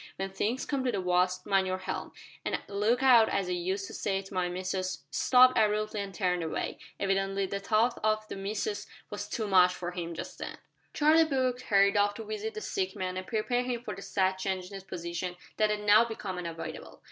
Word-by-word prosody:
When 195 0 -4
things 220 +6 -1
come 275 -2 -1
to 250 - +1
the 200 - -1
wust 180 0 +1
mind 195 -2 +2
your 185 0 -1
helm, 185 - -5 0.3
an' - - -1
look 215 +6 +1
out 240 -4 +7
as 195 -2 0
I - - -2
used 185 +3 -1
to - - -9
say 195 -1 -1
to 195 - -12
my 180 -1 0
missus 185 -2 -3
" 140 - -46
He - - -25
stopped 255 0 +6
abruptly 215 0 +1
and 200 -1 -5
turned 180 -3 0
away. 160 -1 -3 0.2
Evidently 195 0 0
the 200 +1 -3
thought 220 +4 +1
of 215 0 +1
the - - -6
"missus" 215 - -3 0.2
was - - -5
too 225 - -2
much 180 -2 +5
for 175 -1 -4
him 170 -1 -5
just - - -7
then. - - -6 0.4
Charlie 310 +2 +5
Brooke 260 -5 0
hurried 200 -4 +4
off 205 0 +3
to - - -6
visit 435 0 -4
the 435 - -4
sick 385 -3 -2
man, 185 -1 -3
and 185 0 -5
prepare 240 +2 0
him 245 -1 -3
for 210 - -4
the 195 - -9
sad 190 -1 0
change 190 -1 -2
in - - -13
his 195 -1 -7
position 175 0 -4 0.2
that 215 0 +3
had 210 0 -1
now 210 +2 +6
become 210 -5 -5
unavoidable. 165 -2 -7
200 Hz, 225 wpm, -30 LUFS, 185-230 Hz, 0.4 s, out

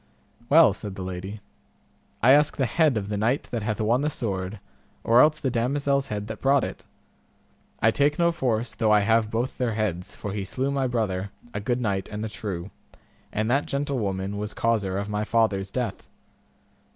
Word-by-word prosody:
Well, 160 +2 +7
said 100 -3 -7
the 95 - -5
lady, 95 +3 -6 0.8
I 125 - +7
ask 150 +1 +4
the 135 - +2
head 150 -1 +2
of 100 -2 -3
the 105 -1 -2
knight 120 +7 +1
that 120 - -2
hath 105 0 -2
won 115 +4 +2
the 150 - +1
sword, 100 -6 -3 0.4
or 115 +2 +6
else 155 0 +4
the 135 -4 -1
damosel's 140 +3 +1
head 105 -1 -4
that 110 0 -7
brought 135 0 +4
it; - - -5 1.0
I 115 - +6
take 145 +5 +2
no 170 0 +3
force 120 -7 -1
though 110 -2 +1
I 105 -1 +6
have 110 +1 +2
both 115 +4 -2
their 120 -4 0
heads, 95 -5 -2
for 100 - -5
he 105 -1 -2
slew 130 +8 -2
my 135 -2 0
brother, 100 -5 -1 0.2
a 105 - -2
good 120 +4 -1
knight 100 -4 -1
and 105 +1 -4
a - - -4
true, 100 -3 -5 0.6
and 110 +1 -1
that 140 +3 +1
gentlewoman 100 -9 -2
was 105 0 -4
causer 105 -5 0
of 100 0 -2
my 105 0 -1
father's 105 -4 +1
death. 115 -3 -4
110 Hz, 190 wpm, -25 LUFS, 100-130 Hz, 1.0 s, Well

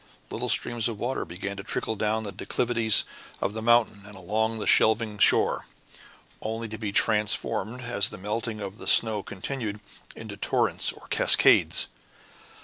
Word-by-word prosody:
Little - - -4
streams 120 -1 +2
of 110 -3 -7
water 130 +2 -3
began 95 +4 -7
to 100 - -7
trickle 110 +1 -3
down 110 +1 -2
the 100 - -6
declivities 115 +2 +1 0.4
of 100 - -2
the 110 - -5
mountain 120 -3 +2
and 105 - -13
along 110 +4 -2
the 105 - -5
shelving 110 -1 +2
shore, - - +2 0.7
only 115 +1 -5
to 110 0 -8
be 105 -3 -4
transformed, 105 +3 0
as 115 -5 +2
the - - -10
melting 110 +3 -5
of 100 +1 -8
the - - -9
snow 110 -3 +5
continued, 105 +2 -6 0.4
into - - -10
torrents - - -1
or - - -16
cascades. - - +4
110 Hz, 155 wpm, -25 LUFS, 100-115 Hz, 0.7 s, snow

